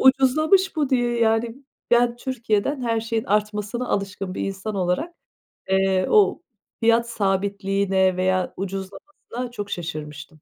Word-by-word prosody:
Ucuzlamış 310 +9 +4
bu 295 -3 +1
diye 240 -2 +1
yani 230 +3 +1 0.3
ben 240 0 +4
Türkiye'den 240 +1 -1
her 230 -2 0
şeyin 225 0 -2
artmasına 210 +3 -1
alışkın 195 -1 -3
bir - - -4
insan 195 +2 -4
olarak, 190 - -1 0.6
eee, 190 -1 +2
o 410 -5 +4 0.4
fiyat 230 +1 +3
sabitliğine 195 -2 +1
veya 185 0 0
ucuzlamasına 200 +6 -6
çok 205 -4 -6
şaşırmıştım. 155 -3 -5
215 Hz, 120 wpm, -23 LUFS, 195-245 Hz, 0.6 s, Ucuzlamış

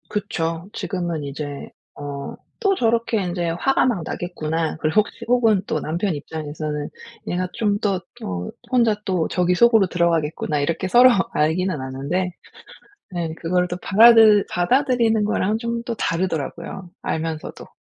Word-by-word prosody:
그쵸. 170 -3 -3
지금은 175 -5 -3
이제 145 0 -6 0.3
어 140 -1 -6 0.2
'또 395 -4 +2
저렇게 230 - +1
인제 175 -1 -2
화가 270 +11 +1
막 225 -10 0
나겠구나.' 160 -2 -3
그리고 160 +7 +3
혹시 230 +2 -10
혹은 230 -5 +3
또 155 - -1
남편 170 +6 -2
입장에서는 150 0 -5 0.4
'얘가 180 +1 -1
좀 205 -2 0
더 195 -3 0 0.2
어 90 -1 -4 0.2
혼자 235 -4 +3
또 180 -4 0
저기 180 0 +1
속으로 225 -1 +5
들어가겠구나.' 165 -3 0
이렇게 165 +5 -1
서로 245 +6 +7 0.2
알기는 160 +2 +1
아는데, 140 +8 -2 0.9
예 165 -2 -2
그걸 180 +2 0
또 175 - -3
받아들 220 0 +7
받아들이는 235 +2 +2
거랑은 210 0 0
좀 235 0 -3
또 235 - -3
다르더라고요, 170 +1 -3
알면서도. 160 -1 -4
180 Hz, 315 characters per minute, -22 LUFS, 160-215 Hz, 0.9 s, 서로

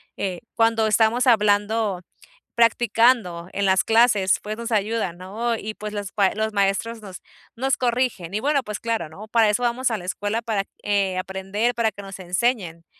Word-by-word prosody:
eh, 185 0 -3
cuando 225 -1 +2
estamos 220 +4 +3
hablando, 210 -3 +2 0.5
practicando 230 -6 +2
en 200 -1 -1
las 190 0 +3
clases, 225 -4 +4
pues 215 +1 -5
nos 235 0 -5
ayudan, 210 -4 -1
¿no? 225 +6 -2
Y 215 0 -6
pues 210 0 -7
los 205 -2 -5
pa 195 -2 +2
los 220 0 -2
maestros 205 +3 0
nos 190 -3 -9 0.4
nos 265 +2 0
corrigen 240 -8 -1
y 210 - -1
bueno, 280 0 +1
pues 210 -2 -6
claro, 225 -9 -2
¿no? 210 +7 -11
Para 220 -2 +4
eso 245 +4 -1
vamos 245 +1 0
a 225 - -1
la 180 - -9
escuela 205 +4 -2
para, 215 -4 -2 0.2
eh, 195 -2 0
aprender, 195 +5 -2
para 230 -2 +1
que 205 - -10
nos 195 -1 -9
enseñen. 180 -3 -1
215 Hz, 180 wpm, -23 LUFS, 195-230 Hz, 0.5 s, clases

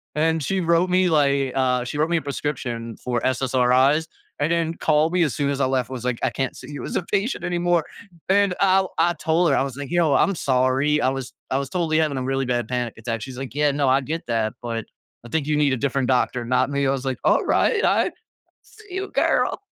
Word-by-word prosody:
And 160 +1 +1
she 190 +6 -1
wrote 170 +2 +2
me 185 0 +3
like, 140 -3 +2
uh, 125 -2 +1
she 130 +4 -5
wrote 155 +2 +1
me 170 - +2
a - - -1
prescription 130 -5 -4
for 120 -1 -1
SSRIs, 130 +3 +2 0.3
and 145 +2 +1
then 165 -1 0
called 155 +1 +2
me 180 -2 +3
as 150 - -1
soon 140 -1 0
as 140 0 -2
I - - +3
left, 130 -1 0
was 125 -2 -6
like, 125 -2 -1
"I - - +3
can't 135 -1 -3
see - - -10
you 145 - -6
as - - -5
a - - +1
patient 205 +7 -1
anymore." 175 -2 +1 0.5
And 200 -2 +3
I'll 190 -1 +3
I 170 +1 +3
told 165 0 +1
her, 135 - +3
I - - +2
was 135 -2 -5
like, 145 0 -6
"Yo, 170 -4 +3
I'm 195 +5 +3
sorry, 135 +2 +1
I 130 - +3
was 135 -1 -5 0.2
I 130 - +2
was 140 -1 -3
totally 165 -3 0
having 150 -4 +1
a 130 - -2
really 135 0 -1
bad 120 -3 -1
panic 125 -2 -2
attack," 115 0 -4
she's 130 -2 -8
like, 135 -2 -6
"Yeah, 150 -1 +2
no, 140 -1 +1
I 135 +1 +4
get 160 +5 -4
that, 115 -2 0
but 115 -2 -4 0.4
I 120 - -10
think 150 +2 -1
you 150 -1 +1
need 145 -3 +2
a - - 0
different 135 -1 0
doctor, 125 -1 +1
not 130 +2 +1
me." 140 -1 0
I - - +2
was 135 -1 -2
like, 130 -2 -2
"Alright, 440 - +2
I - - +2 0.5
see 430 -1 -19
you, 390 +1 -3
girl!" - - +1
140 Hz, 240 wpm, -23 LUFS, 130-165 Hz, 0.5 s, I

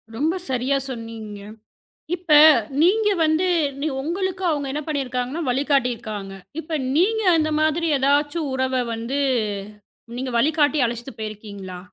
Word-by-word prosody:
ரொம்ப 310 +8 0
சரியா 260 +2 +1
சொன்னீங்க. 225 -4 -7 0.8
இப்ப 350 -2 -7 0.5
நீங்க 420 +5 +4 0.2
வந்து 315 +4 +2 0.6
உங்களுக்கு 370 +5 -3
அவங்க 290 -2 -2
என்ன 295 +2 -3
பண்ணியிருக்காங்கன்னா 265 0 -2
வழிகாட்டியிருக்காங்க. 245 -7 -1 0.3
இப்ப 320 0 -3 0.2
நீங்க 440 +7 +2
அந்த 310 -1 +1
மாதிரி 315 +2 +1
எதாச்சு 290 +4 +1
உறவ 260 0 0 0.2
வந்து 230 +5 -3 1.0
நீங்க 255 0 -3
வழிகாட்டி 300 +2 +2
அழைச்சுட்டு 235 +1 -5
போயிருக்கீங்களா? 200 -4 -7
275 Hz, 110 wpm, -22 LUFS, 235-315 Hz, 1.0 s, நீங்க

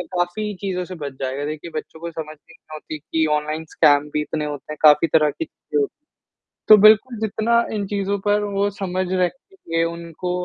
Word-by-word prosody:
काफ़ी 180 +4 -1
चीज़ों 185 -2 -2
से 185 - -8
बच 145 -4 -6
जाएगा। 135 +2 -2
देखिए 155 +3 -6
बच्चों 155 +1 -6
को 170 +1 -6
समझ 155 -1 -7
नहीं 165 +2 -21 0.2
होती 155 0 -7
कि 160 +1 -1
ऑनलाइन 155 +2 -3
स्कैम 145 0 +4
भी 150 - +1
इतने 150 0 -3
होते 145 0 -6
हैं, 155 - -6
काफ़ी 150 +1 +6
तरह 155 -2 +5
की 325 - -5
चीज़ें 435 - -4
होती 420 - -3
हैं। - - -67 0.6
तो 215 - +11
बिल्कुल 220 +3 +6
जितना 225 +2 +1
इन 205 -2 -2
चीज़ों 200 0 -1
पर 205 0 +3
वो 200 0 0
समझ 185 -2 -3
रखेंगे, 185 - -2
उनको 170 +1 -5
170 Hz, 195 wpm, -21 LUFS, 155-205 Hz, 0.6 s, तो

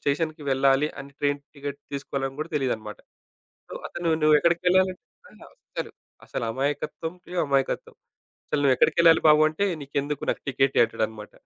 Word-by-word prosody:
స్టేషన్‍కేళ్ళాలి 140 -2 +1
అని 140 0 -10
train 145 0 +1
ticket 140 -1 -6
తీసుకోవాలని 135 -1 -3
కూడా 155 +2 -4
తెలీదన్నమాట. 110 -6 -2 0.7
సో - - -8
అతను 175 -1 -3
నువ్వు 155 0 +6
ఎక్కడికేళ్లాలంటే 180 +2 +2 0.3
ఆహ్ - - -18 0.3
అసలు - - -3 0.3
అసలు 120 - -4
అమాయకత్వంకే 145 +7 -4
అమాయకత్వం. 140 -2 -1 0.5
"అసలు 150 - -1
నువ్వు 135 -2 +5
ఎక్కడికెళ్ళాలి 165 +5 +5
బాబు" 150 0 +7
అంటే 155 +6 -1 0.2
"నీకెందుకు 140 +1 -3
నాకు - - -1
టికెట్ 135 0 +1
ఇయ్యి" - - +7
అంటాడన్నమాట. 110 -1 -4
145 Hz, 135 wpm, -25 LUFS, 135-160 Hz, 0.7 s, బాబు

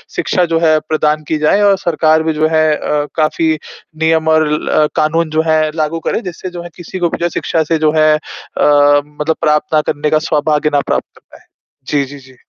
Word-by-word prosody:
शिक्षा 180 -3 +1
जो 165 - +3
है, 155 -2 +3
प्रदान 155 0 0
की 155 - 0
जाए 155 +7 +2
और 200 -1 +4
सरकार 160 -2 +1
भी 160 - 0
जो 155 +1 +1
है 155 0 +3
अ, 150 0 -2
काफ़ी 160 +1 +1 0.5
नियम 160 0 +2
और 160 -1 +3
ल 150 0 +1
कानून 155 +1 +1
जो - - +5
है 155 -1 +2
लागू 160 +1 -1
करे। - - -1
जिससे 180 0 -7
जो 175 -1 -8
है 175 - -9
किसी 180 +2 -8
को 170 -1 +1
भी - - -4
जो 170 - -2
है - - +1
शिक्षा 160 -1 0
से 165 - +3
जो - - +3
है 155 0 +4
अ, 155 - -3 0.9
मतलब 150 +2 -3
प्राप्त 150 0 +1
ना 155 - +4
करने 150 +1 -2
का 155 - +2
सौभाग्य 150 0 +1
ना 145 - +3
प्राप्त - - -2
हो - - -20
पाए। - - -17 0.4
जी, 140 -2 0
जी, 140 +1 -11
जी। 130 -1 -18
155 Hz, 225 wpm, -15 LUFS, 150-165 Hz, 0.9 s, जो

